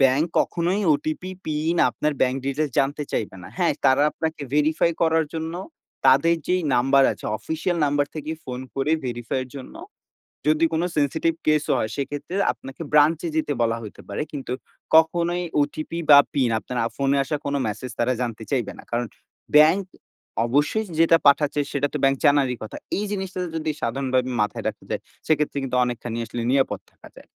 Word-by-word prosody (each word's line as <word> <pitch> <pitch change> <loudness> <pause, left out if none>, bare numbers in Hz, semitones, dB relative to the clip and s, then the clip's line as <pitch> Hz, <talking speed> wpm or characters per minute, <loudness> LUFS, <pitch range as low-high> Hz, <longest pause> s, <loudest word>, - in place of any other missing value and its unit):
Bank 135 +4 +4
কখনোই 175 +4 +1
OTP, 155 +5 -3
pin, 155 +2 -1
আপনার 150 0 -1
bank 130 0 +2
details 140 +2 -1
জানতে 140 +2 +1
চাইবে 100 -3 -2
না। - - -9
হ্যাঁ, 175 -5 +2
তারা 135 +1 +5
আপনাকে 160 -1 -3
ভেরিফাই 155 +3 +3
করার 160 -1 +3
জন্য 160 +1 -3 0.5
তাদের 165 +6 +5
যেই 180 -1 +1
নাম্বার 135 +3 +4
আছে - - -13
অফিসিয়াল 160 +2 -2
নাম্বার 145 0 +1
থেকে 155 0 -5
ফোন 125 0 -5
করে 135 +2 0
ভেরিফাই 120 +1 -2
এর - - -15
জন্য। 130 - -9 0.7
যদি 155 +2 +4
কোন 160 - +1
সেনসিটিভ 160 +3 +1
কেস 155 -1 +3
ও - - +4
হয় 110 - -2
সেক্ষেত্রে 145 +6 -4 0.2
আপনাকে 135 +5 -11
ব্রাঞ্চে 155 +3 +4
যেতে 155 -2 0
বলা 115 0 +1
হইতে 105 - -10
পারে। 100 - -3
কিন্তু 135 -4 -4 0.4
কখনোই 170 +2 +3 0.2
ওটিপি 155 +3 -3
বা 145 - +10 0.2
পিন 130 -4 +2
আপনার 125 - -6
আ - - +1
ফোনে 140 0 +2
আসা 150 - -2
কোন 140 - -1
মেসেজ 110 +4 -5
তারা 125 +2 +2
জানতে 115 -2 -3
চাইবে 125 -6 0
না। - - -11
কারণ 120 +1 0 0.5
ব্যাংক 160 +6 +6 0.6
অবশ্যই 145 - +1
যেটা 165 0 +6
পাঠাচ্ছে, 145 +1 +4
সেটা 145 0 0
তো - - 0
ব্যাংক 135 0 +4
জানারই 140 -3 +4
কথা। 110 - -7 0.2
এই 210 - -1
জিনিসটা 190 -2 -4 0.2
যদি 155 -1 -1
সাধারণভাবে 130 +1 0
মাথায় 105 0 -2
রাখা - - -5
যায় - - -2 0.3
সেক্ষেত্রে 150 -2 +1
কিন্তু 130 -1 -2
অনেকখানি 120 -1 -3
আসলে 120 +2 -5
নিরাপদ 135 0 +1
থাকা - - -16
যায়। - - -14
145 Hz, 175 wpm, -23 LUFS, 130-160 Hz, 0.7 s, বা